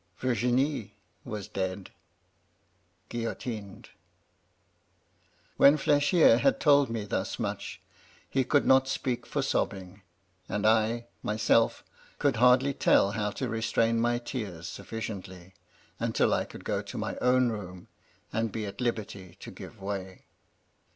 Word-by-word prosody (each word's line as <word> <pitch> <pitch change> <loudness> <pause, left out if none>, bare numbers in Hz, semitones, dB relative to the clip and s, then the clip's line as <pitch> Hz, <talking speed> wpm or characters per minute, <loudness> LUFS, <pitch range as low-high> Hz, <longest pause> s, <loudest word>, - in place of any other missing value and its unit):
Virginie 125 0 0 0.3
was 105 -2 -6
dead 95 -2 -4 0.6
— 90 +2 -42
^guillotined.' 115 -3 -5 0.8
" - - -39
When 140 +2 +7
Flechier 145 +3 +4
had 275 0 +2
told 140 -3 +5
me 115 -2 -3
thus 100 - -2
much, - - -4 0.5
he 135 - +1
could 145 +2 +2
not 130 0 +5
spejpk 135 -2 -2
for - - -1
sobbing; 95 0 -2 0.5
and 105 +1 -2
I, 110 +2 +2 0.2
myself, 110 +1 +2 0.3
could 140 -5 +1
hardly 125 +3 +5
tell 100 - +3
how 105 -1 -1
to 125 +5 -4
restrain 115 0 +1
my 120 +1 +2
tears 105 -9 -5
sufficiently, 95 -3 -7 0.5
until - - +1
I - - 0
could - - -12
go - - -1
to - - -8
my - - -3
own 125 0 +3
room 90 -5 -7 0.5
and 110 0 0
be 110 0 -4
at 100 +5 -7
liberty 105 -7 -4
to - - -9
give - - -11
way. 95 -1 -6
115 Hz, 130 wpm, -28 LUFS, 100-125 Hz, 0.8 s, When